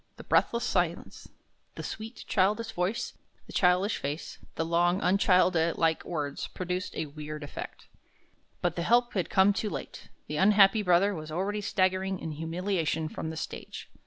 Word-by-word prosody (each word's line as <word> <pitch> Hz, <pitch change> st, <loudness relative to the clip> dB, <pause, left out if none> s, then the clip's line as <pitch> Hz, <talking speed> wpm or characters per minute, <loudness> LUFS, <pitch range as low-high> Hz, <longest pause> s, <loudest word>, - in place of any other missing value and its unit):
The -, -, -9 dB
breathless 235 Hz, 0 st, +2 dB
silence, 175 Hz, -7 st, -1 dB, 0.5 s
the -, -, -6 dB
sweet, 220 Hz, +2 st, -7 dB
childish 215 Hz, +4 st, +1 dB
voice, 205 Hz, +3 st, -2 dB, 0.3 s
the -, -, -12 dB
childish 180 Hz, +3 st, +3 dB
face, 145 Hz, +4 st, -5 dB, 0.2 s
the 165 Hz, -, -1 dB
long, 175 Hz, +2 st, +2 dB
unchildlike 180 Hz, -4 st, +3 dB
words, 145 Hz, -4 st, -3 dB
produced 180 Hz, 0 st, -4 dB
a 160 Hz, -, -2 dB
weird 150 Hz, +1 st, -7 dB
effect. 145 Hz, -, -8 dB, 0.8 s
But 175 Hz, -1 st, +1 dB
the 170 Hz, -, -2 dB
help 240 Hz, +6 st, +3 dB
had 185 Hz, -4 st, -1 dB
come 195 Hz, +1 st, +5 dB
too 210 Hz, +2 st, -2 dB
late; -, -, -7 dB, 0.2 s
the 150 Hz, -, -4 dB
unhappy 200 Hz, +3 st, +5 dB
brother 190 Hz, +1 st, +3 dB
was 155 Hz, -3 st, -7 dB
already 200 Hz, +5 st, -1 dB
staggering 190 Hz, -1 st, +1 dB
in 160 Hz, -, -5 dB
humiliation 165 Hz, 0 st, -1 dB
from 160 Hz, -, -5 dB
the 160 Hz, -, -6 dB
stage. -, -, -7 dB
180 Hz, 155 wpm, -29 LUFS, 160-200 Hz, 0.8 s, come